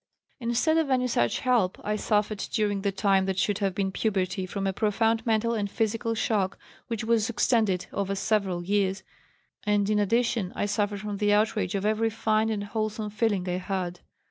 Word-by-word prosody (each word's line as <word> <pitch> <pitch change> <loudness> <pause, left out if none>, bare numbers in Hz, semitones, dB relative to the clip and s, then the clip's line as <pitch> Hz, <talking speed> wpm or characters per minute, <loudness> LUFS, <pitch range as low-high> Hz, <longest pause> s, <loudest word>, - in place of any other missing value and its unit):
"Instead 250 +7 +2
of 315 -3 0
any 255 -1 +2
such 120 - +1
help, 235 -8 +2
I 210 +1 -1
suffered 210 -1 0
during 205 -3 0
the 200 0 0
time 195 -1 +2
that 190 -1 -1
should 205 +1 +1
have 195 -3 0
been 195 -1 0
puberty 190 -2 -1
from 195 +1 -3
a 195 - 0
profound 225 +2 +1
mental 225 +1 +2
and 205 -3 -1
physical 225 +2 -1
shock 205 -4 0 0.3
which 230 -3 -3
was 225 -1 +2
extended 220 -6 +1
over 200 0 -1
several 195 -4 0
years, 195 0 0 0.6
and 205 -1 +2
in 210 - +2
addition 225 -2 +1
I - - 0
suffered 205 0 -1
from 210 -1 -4
the 205 0 +2
outrage 210 -3 +1
of 195 +1 -1
every 220 +1 +2
fine 220 0 +1
and 210 -2 -2
wholesome 215 0 -3
feeling 210 -4 0
I 180 0 0
had. 180 -2 -3
210 Hz, 185 wpm, -27 LUFS, 195-225 Hz, 0.6 s, Instead